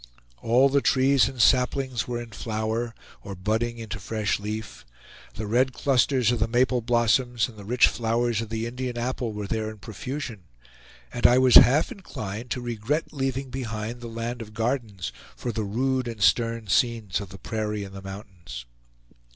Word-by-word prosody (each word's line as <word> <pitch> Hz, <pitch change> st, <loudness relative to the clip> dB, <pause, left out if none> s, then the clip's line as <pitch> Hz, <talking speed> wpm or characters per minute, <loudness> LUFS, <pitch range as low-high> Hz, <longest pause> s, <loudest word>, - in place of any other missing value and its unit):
All 125 Hz, +4 st, +4 dB
the 140 Hz, +1 st, +2 dB
trees 135 Hz, 0 st, +4 dB
and 130 Hz, -, -10 dB
saplings 125 Hz, 0 st, +2 dB
were 120 Hz, -1 st, -2 dB
in 120 Hz, -1 st, -8 dB
flower, 110 Hz, +1 st, -3 dB, 0.3 s
or 100 Hz, -, -6 dB
budding 110 Hz, +5 st, -1 dB
into 110 Hz, -2 st, -6 dB
fresh 105 Hz, +1 st, -1 dB
leaf; 105 Hz, +2 st, -6 dB, 0.5 s
the 110 Hz, -, -4 dB
red 125 Hz, +5 st, +2 dB
clusters 130 Hz, -3 st, +2 dB
of 120 Hz, -, 0 dB
the -, -, +2 dB
maple 125 Hz, +1 st, +2 dB
blossoms 120 Hz, 0 st, +2 dB
and 120 Hz, -, -13 dB
the 105 Hz, -, -10 dB
rich 120 Hz, +4 st, +4 dB
flowers 115 Hz, -1 st, 0 dB
of 115 Hz, -, -6 dB
the 115 Hz, 0 st, -2 dB
Indian 125 Hz, +1 st, -4 dB
apple 120 Hz, -1 st, -2 dB
were 105 Hz, -1 st, -5 dB
there 110 Hz, +1 st, -2 dB
in 110 Hz, -, -9 dB
profusion; 110 Hz, -, -6 dB, 0.7 s
and 120 Hz, -, +5 dB
I 120 Hz, -, +5 dB
was 130 Hz, -1 st, +5 dB
half 145 Hz, +5 st, +8 dB
inclined 115 Hz, -, -6 dB
to 125 Hz, -, -2 dB
regret 120 Hz, +7 st, -2 dB
leaving 135 Hz, -2 st, -2 dB
behind 115 Hz, -2 st, -4 dB
the 120 Hz, -, -6 dB
land 115 Hz, +1 st, -4 dB
of 105 Hz, -1 st, -10 dB
gardens 110 Hz, -, -2 dB, 0.2 s
for 120 Hz, -, -3 dB
the 110 Hz, -1 st, -2 dB
rude 130 Hz, +5 st, 0 dB
and 115 Hz, -2 st, -6 dB
stern 115 Hz, +2 st, +2 dB
scenes 110 Hz, -3 st, +1 dB
of 100 Hz, -, -8 dB
the 95 Hz, -, -10 dB
prairie 105 Hz, +1 st, -3 dB
and 95 Hz, -1 st, -9 dB
the 95 Hz, -, -8 dB
mountains. 95 Hz, -, -9 dB
115 Hz, 175 wpm, -26 LUFS, 110-125 Hz, 0.7 s, half